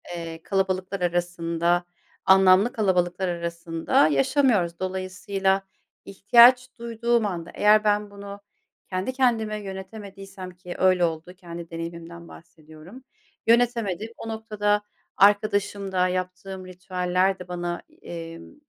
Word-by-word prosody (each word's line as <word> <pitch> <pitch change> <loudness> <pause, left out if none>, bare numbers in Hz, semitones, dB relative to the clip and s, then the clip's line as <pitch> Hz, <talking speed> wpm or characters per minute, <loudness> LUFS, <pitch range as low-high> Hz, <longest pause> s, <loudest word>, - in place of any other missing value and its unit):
eee, 165 -1 -7
kalabalıklar 190 -1 -1
arasında, 175 0 0 0.4
anlamlı 190 +4 +6
kalabalıklar 185 -3 0
arasında 170 -2 0
yaşamıyoruz. 170 - +2
Dolayısıyla 190 +1 -1 0.4
ihtiyaç 240 +6 +6
duyduğum 235 0 0
anda 175 -4 -4
eğer 215 +1 +4
ben 210 0 +1
bunu 200 0 -9 0.5
kendi 185 +7 -2
kendime 230 -5 +1
yönetemediysem, 195 -1 -9
ki 180 0 -10
öyle 185 -1 +4
oldu. 165 +2 -5
Kendi 170 -2 -9
deneyimimden 170 0 -8
bahsediyorum. 160 - -14 0.4
Yönetemedim. 230 -4 +2
O 225 - -7
noktada 210 -2 -1 0.4
arkadaşımda 200 -2 +2
yaptığım 185 +1 -5
ritüeller 185 +1 -1
de 180 - -9
bana 175 -1 -4 0.2
e 165 -1 -7
imm, 165 - -12
185 Hz, 105 wpm, -25 LUFS, 175-205 Hz, 0.5 s, anlamlı